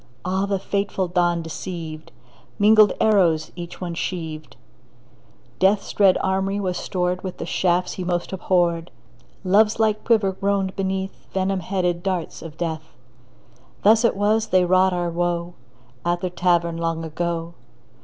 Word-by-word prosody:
Ah, 190 +2 0
the 200 -1 0
fateful 195 -1 -2
dawn 175 -1 +1
deceived! 160 -1 -7 0.5
Mingled 215 0 +6
arrows 175 -8 +3
each 175 -1 -8
one 175 -2 -4
sheaved; 160 -3 -5 1.0
Death's 195 +2 +2
dread 195 -3 +5
armoury 195 +1 0
was 185 -3 -2
stored 180 0 -2
With 185 -2 -5
the - - -5
shafts 180 0 0
he 185 - -5
most 175 +1 -2
abhorred; 175 -2 +1 0.5
Love's 210 +4 +3
light 215 -1 +1
quiver 215 -5 +3
groaned 195 0 -1
beneath 190 0 -3
Venom 190 0 0
headed 180 -1 -1
darts 185 -3 -3
of 160 -1 -10
Death. 160 -4 -4 0.9
Thus 220 +3 +5
it 230 - +3
was 215 +2 +2
they 185 -1 +3
wrought 185 +1 +4
our 175 -1 -1
woe 175 0 -1 0.5
At 175 0 0
the 185 - -2
Tavern 175 -2 +1
long 165 -1 -2
ago. 170 +1 -3
180 Hz, 145 wpm, -22 LUFS, 170-195 Hz, 1.0 s, Mingled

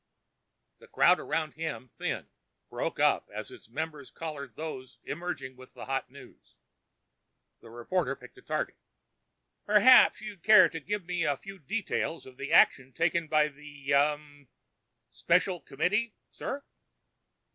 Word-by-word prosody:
The - - -16
crowd - - +4
around 155 0 -2
him 155 -6 -5
thinned, - - -4 0.4
broke - - -3
up - - +2
as - - -7
its - - -14
members 150 +1 -5
collared 150 -4 -7
those 140 -5 -7
emerging 140 -7 -5
with 130 0 -16
the 125 - -8
hot 135 0 -2
news. - - -16 1.0
The 115 - -15
reporter 135 +5 -2
picked 125 -2 -15
a - - -16
target. - - -3 0.9
"Perhaps 210 +5 +7
you'd 210 -4 -9
care 215 +4 +7
to 165 - -6
give 200 +4 -4
me 175 -1 -1
a 145 -3 +1
few 195 +3 -11
details 180 0 -3
of 130 -1 -14
the 135 - -5
action 130 -1 +4
taken 165 +2 +1
by 150 -1 +3
the... 145 -1 -6
ah... 145 +1 +4 0.9
Special 180 +1 +1
Committee, 210 +11 -1 0.2
sir?" 280 +1 -5
155 Hz, 140 wpm, -29 LUFS, 135-180 Hz, 1.0 s, Perhaps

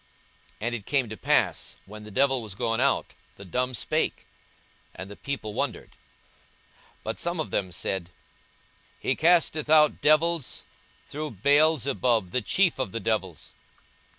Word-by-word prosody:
And 120 +3 -2
it 110 -4 -6
came 135 -5 +2
to 110 - -6
pass, 95 - 0
when 105 +2 -11
the - - -10
devil 135 +3 +2
was 105 -4 -8
gone 115 +3 -1
out, 140 - +1 0.2
the 100 - -11
dumb 125 +7 -1
spake; - - -1 0.7
and 95 +1 -8
the - - -8
people 115 -6 -5
wondered. - - -3
42:011:015 - - -26 1.1
But - - -4
some 170 0 -2
of 155 - -3
them 95 -3 -1
said, 90 0 -3 0.9
He - - 0
casteth 160 -2 +2
out 155 -1 +5
devils 160 0 +2 0.4
through 155 +1 -5
Beelzebub 140 - +3
the 125 - 0
chief 180 - +1
of 125 -8 -2
the 115 - -2
devils. 95 -7 -3
125 Hz, 150 wpm, -26 LUFS, 105-150 Hz, 1.1 s, out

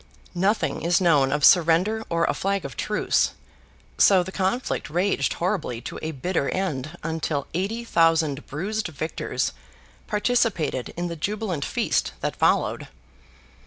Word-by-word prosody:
Nothing 195 +5 0
is 170 +1 +2
known 150 -7 +3
of 150 0 +3
surrender 180 +6 +4
or 170 0 +1
a - - +1
flag 195 -3 -1
of 135 - -7
truce, - - +1 0.7
so 190 -3 +6
the 190 - -7
conflict 195 +4 -1
raged 175 -3 +1
horribly 175 - -2
to - - -7
a 160 - -3
bitter 160 0 -1
end 155 -4 -3
until 160 -3 -2
eighty 200 +7 -2
thousand 165 -7 +2
bruised 205 +9 -3
victors 160 0 -3 0.6
participated 210 - 0
in 175 0 -1
the 170 - -5
jubilant 190 -2 -2
feast - - 0
that - - -2
followed. - - +1
170 Hz, 135 wpm, -24 LUFS, 155-195 Hz, 0.7 s, so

